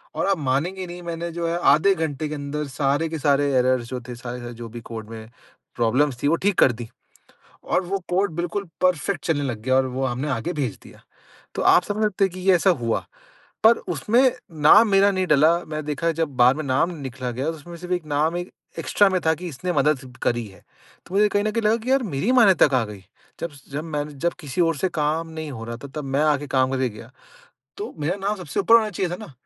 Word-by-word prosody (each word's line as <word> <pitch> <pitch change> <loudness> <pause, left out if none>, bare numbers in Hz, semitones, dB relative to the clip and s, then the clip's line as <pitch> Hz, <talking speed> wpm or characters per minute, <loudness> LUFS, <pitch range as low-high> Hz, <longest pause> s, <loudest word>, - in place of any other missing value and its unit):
और - - 0
आप 195 -1 +2
मानेंगे 160 +7 -1
नहीं 175 +1 -8
मैंने 170 0 -4
जो 170 0 -3
है 170 +1 -1 0.2
आधे 195 +6 +4
घंटे 155 -2 -2
के 150 - -4
अंदर 145 +1 -4
सारे 140 +3 0
के 160 - -4
सारे 145 -1 +2
एरर्स 125 -1 +2
जो 125 -1 -4
थे 125 - -6
सारे 120 0 -7
जो 115 0 -8
भी 120 +1 -8
कोड 110 -1 -8
में 110 -1 -9 0.5
प्रॉब्लम्स 125 +3 +1
थीं 145 - +3
वो 165 - +4
ठीक 200 +3 0
कर 130 - +6
दी। 120 -1 -8 0.7
और - - +1
वो 195 +3 -1
कोड 190 +2 +1
बिल्कुल 175 +4 -2 0.2
परफेक्ट 180 +1 +1
चलने 150 -3 0
लग 120 -6 -3
गया 130 +3 +1
और 130 0 +3
वो 130 +1 -2
हमने 130 +3 -2
आगे 165 +6 -2
भेज 135 - -2
दिया। - - -16 0.5
तो - - -2
आप 180 - +5
समझ 210 +3 -2
सकते 205 -2 +2
हैं 190 - -3
कि 185 - -8
ये 185 0 +4
ऐसा 180 +3 +3
हुआ। 120 -10 +1 0.6
पर 225 +1 +7 0.2
उसमें 235 - +3 0.3
नाम 210 +10 +7
मेरा 195 0 +5
नहीं 185 -1 -1
डाला 155 +2 +5
मैंने 155 0 -5
देखा 150 +3 -1
जब 160 -5 -1
बाद 125 +2 +6
में 155 - -3
नाम 140 +5 +1
निकला 130 -3 -5
गया 130 +3 -3
तो 160 - -1
उसमें 170 +3 -11
सिर्फ़ 180 +1 -4
एक 175 -3 -2
नाम 155 +3 0
एक 175 0 -6 0.3
एक्स्ट्रा 205 - +3
में 185 -1 +1
था 160 - +4
कि 180 +3 -7
इसने 170 +4 -4
मदद 150 -2 +2 0.2
करी 120 -1 0
है। 95 - -16 0.5
तो 180 - -12
मुझे 210 +1 +5
कहीं 205 0 +1
न 215 - 0
कहीं 230 +1 -1
लगा 215 +1 +4
कि 235 +3 -3
यार 270 -1 +3
मेरी 185 - -1
मान्यता 225 -11 +6
कहाँ 130 -4 +1
गई। 105 -2 -9 0.4
जब-जब 145 -2 -6
मैंने 150 -2 -4
जब 170 +5 -1
किसी 150 +2 -2
और 165 -1 +2
से 185 +6 -1
काम 160 +1 -1
नहीं 160 -2 -6
हो 115 -4 -7
रहा 115 0 -6
था - - -6
तब 150 - -3
मैं 135 +1 0
आके 145 -1 +1
काम 130 -1 +1
करके 130 -1 0
गया। 110 +3 -12 0.7
तो 410 - -6
मेरा 155 +5 -1
नाम 200 +2 -2
सबसे 180 -7 -3
ऊपर 230 - +5
होना 220 -2 +5
चाहिए 180 -1 -2
था - - -2
ना 150 - -13
155 Hz, 240 wpm, -23 LUFS, 130-180 Hz, 0.7 s, पर